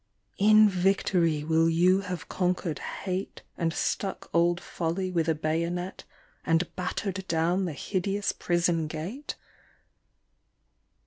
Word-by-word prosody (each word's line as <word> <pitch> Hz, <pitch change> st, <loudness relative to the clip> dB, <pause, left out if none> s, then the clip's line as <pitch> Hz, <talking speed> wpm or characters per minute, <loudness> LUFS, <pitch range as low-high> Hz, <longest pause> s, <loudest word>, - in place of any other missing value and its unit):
In 215 Hz, +1 st, +7 dB
victory 180 Hz, -4 st, +2 dB
will 160 Hz, +1 st, +3 dB
you 180 Hz, +3 st, +4 dB
have 180 Hz, -3 st, -5 dB
conquered 180 Hz, -3 st, -1 dB
Hate, 190 Hz, 0 st, -4 dB
And 165 Hz, -2 st, 0 dB
stuck 195 Hz, +4 st, -2 dB
old 170 Hz, +1 st, +3 dB
Folly 175 Hz, +3 st, -3 dB
with 165 Hz, -2 st, +1 dB
a 160 Hz, -, +2 dB
bayonet 170 Hz, +4 st, -2 dB, 0.4 s
And 165 Hz, +1 st, +1 dB
battered 190 Hz, +1 st, -3 dB
down 170 Hz, +3 st, +1 dB
the 170 Hz, -, -3 dB
hideous 195 Hz, +6 st, -1 dB
prison 170 Hz, -2 st, 0 dB
gate 180 Hz, -, -5 dB
175 Hz, 115 wpm, -28 LUFS, 165-190 Hz, 0.4 s, In